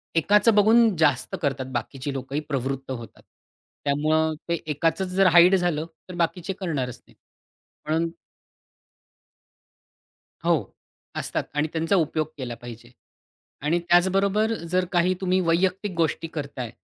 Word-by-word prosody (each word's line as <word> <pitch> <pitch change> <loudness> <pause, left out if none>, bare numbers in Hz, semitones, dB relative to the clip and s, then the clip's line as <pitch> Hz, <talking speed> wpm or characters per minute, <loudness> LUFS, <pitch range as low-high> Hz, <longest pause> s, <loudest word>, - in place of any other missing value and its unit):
एकाचं 205 +6 +4
बघून 220 +1 +5
जास्त 150 +3 +2
करतात 135 -4 -1
बाकीची 130 +4 -4
लोकं 135 +1 -5
ही 150 - 0
प्रवृत्त 135 0 -3
होतात. 115 -4 -8 0.6
त्यामुळे 155 +2 +1
ते 170 - 0
एकाचंच 165 +6 0
जर 190 +1 +3
हाईड 175 +3 +7
झालं 175 -4 0 0.2
तर 180 - -7
बाकीचे 175 +2 -1
करणारच 145 - -3
नाही. - - -22 0.7
म्हणून 165 +2 0 2.3
हो. - - +1 0.4
असतात - - -2
आणि 150 +1 +1
त्यांचा 165 +4 +1
उपयोग 155 -3 0
केला 125 -3 -5
पाहिजे. 120 0 -11 0.7
आणि 160 +4 +1
त्याचबरोबर 195 +5 +2 0.2
जर 185 0 +2
काही 180 0 +3
तुम्ही 185 0 +2
वैयक्तिक 185 +4 +1
गोष्टी 165 0 0
करताय 140 -6 -5
165 Hz, 125 wpm, -24 LUFS, 140-185 Hz, 2.3 s, हाईड